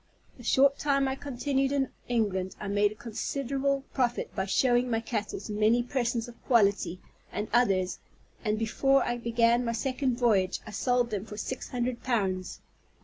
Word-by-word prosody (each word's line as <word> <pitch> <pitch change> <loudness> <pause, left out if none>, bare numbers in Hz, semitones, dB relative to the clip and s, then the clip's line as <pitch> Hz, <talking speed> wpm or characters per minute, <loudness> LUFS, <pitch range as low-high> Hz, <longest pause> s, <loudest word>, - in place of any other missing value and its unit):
The - - -11
short 275 +4 +4
time 275 -2 +2
I 265 - 0
continued 270 0 -1
in 275 -2 +1 0.2
England, 200 -6 0
I 205 - -5
made 205 +1 +2
a - - -9
considerable 275 +4 -2
profit 245 -2 -1
by 190 - -1
showing 245 +4 +3
my 225 -1 +1
cattle 220 -2 -3
to - - -7
many 215 +3 +3
persons 240 -2 -1
of 240 - -14
quality 200 -6 +3 0.3
and 210 +1 -3
others: 195 -7 +2 0.4
and, 215 -2 0
before 270 +5 +2
I 240 - -1
began 235 +1 +2
my 230 -1 -1
second 255 +1 -1
voyage, 205 -7 +2
I - - -8
sold 245 +2 +1
them 205 0 -3
for 210 - -8
six 260 +4 -5
hundred 245 -1 -2
pounds. 195 -7 -1
240 Hz, 170 wpm, -29 LUFS, 210-260 Hz, 0.4 s, short